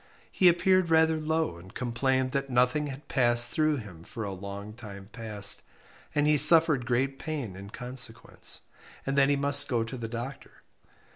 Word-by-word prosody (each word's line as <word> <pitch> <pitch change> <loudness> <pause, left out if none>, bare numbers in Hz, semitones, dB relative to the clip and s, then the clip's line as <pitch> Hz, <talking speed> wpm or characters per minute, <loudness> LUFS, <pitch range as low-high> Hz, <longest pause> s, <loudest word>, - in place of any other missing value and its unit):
He 185 - +3
appeared 185 +1 +2
rather 160 0 +3
low, 160 - -2
and 90 +2 -15
complained 130 +2 -1
that 135 0 -3
nothing 125 +4 +1
had 140 +2 -9
passed 120 -2 +2
through 155 -1 +1
him 95 -9 -10
for 110 +5 -8
a 100 -1 -5
long 100 +2 -8
time 100 -4 -11
past, 105 -3 +2 0.5
and 145 0 +2
he 150 0 +3
suffered 155 -4 +6
great 135 +3 -1
pain 140 -11 -5
in 100 +1 -10
consequence; 125 0 -4 0.4
and 135 - -2
that 140 0 +4
he 145 - +3
must 140 +1 +3
go 120 -4 0
to 115 +3 -7
the 115 -2 -5
doctor. 120 +4 -8
130 Hz, 170 wpm, -27 LUFS, 115-150 Hz, 0.5 s, suffered